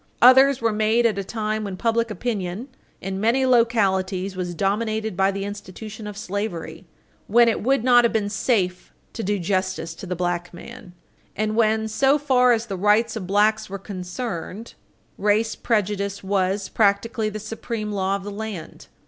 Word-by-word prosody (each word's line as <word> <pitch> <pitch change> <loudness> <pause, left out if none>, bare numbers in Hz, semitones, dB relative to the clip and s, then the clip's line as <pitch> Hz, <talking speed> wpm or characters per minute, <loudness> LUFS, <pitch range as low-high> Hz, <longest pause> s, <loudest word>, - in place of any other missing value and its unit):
Others 265 +1 +7
were 230 -1 +2
made 220 +3 +2
at 215 -3 +2
a - - -2
time 215 +1 -3
when 195 -3 -5
public 230 +2 +1
opinion 210 +1 -4 0.3
in 190 +1 -4
many 240 +5 +2
localities 195 -6 +2
was 180 -1 -4
dominated 215 +2 -1
by 190 +1 +3
the 195 0 -3
institution 210 +2 -8
of 205 -1 -7
slavery, 185 -5 -5 0.4
when 235 +3 +5
it 230 - +1
would 265 +1 +1
not 245 -1 +6
have 235 - +3
been 215 -2 0
safe 200 -4 -1 0.2
to 230 - -4
do 205 0 0
justice 185 -2 -2
to 185 - -10
the 180 - -2
black 175 0 -2
man, 235 0 -11 0.4
and 215 0 -1
when, 220 -1 +2
so 270 +6 +3
far 255 -4 +3
as 230 -1 +1
the 200 -4 -5
rights 210 +4 +2
of 195 -5 -5
blacks 215 +2 +2
were 195 - -4
concerned, 195 +2 -6 0.5
race 215 +2 +2
prejudice 200 -3 -1
was, 195 0 0
practically, 215 +2 +1
the 215 - -6
supreme 215 0 -5
law 195 -1 0
of 200 - -5
the 205 - -6
land. 205 -5 -7
210 Hz, 170 wpm, -23 LUFS, 190-230 Hz, 0.5 s, Others